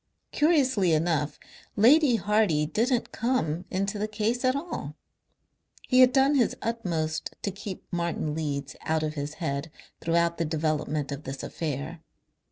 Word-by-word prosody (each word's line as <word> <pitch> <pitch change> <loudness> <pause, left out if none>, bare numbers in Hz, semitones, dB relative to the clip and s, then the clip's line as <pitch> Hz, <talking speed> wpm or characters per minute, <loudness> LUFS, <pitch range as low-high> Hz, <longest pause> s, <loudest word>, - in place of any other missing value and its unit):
Curiously 265 - +3
enough 155 -2 0 0.4
Lady 260 +4 +6
Hardy 205 -6 +2
didn't 230 - 0
come 185 -9 -1
into 195 +2 -2
the 210 - -1
case 215 +3 -1
at 255 +1 +3
all. 330 +5 -5 0.9
He 255 - +4
had 255 0 +8
done 270 +2 +4
his 255 -5 +2
utmost 170 -9 -2
to 200 - -1
keep 195 0 -7
Martin 170 -3 -1
Leeds 140 -3 -3
out 160 0 0
of 155 0 -2
his 145 0 -5
head 140 -1 -3 0.3
throughout 170 0 +1
the - - +2
development 155 -2 -1
of 140 0 -4
this 135 -1 -6
affair. 155 +1 -4
170 Hz, 145 wpm, -27 LUFS, 155-230 Hz, 0.9 s, had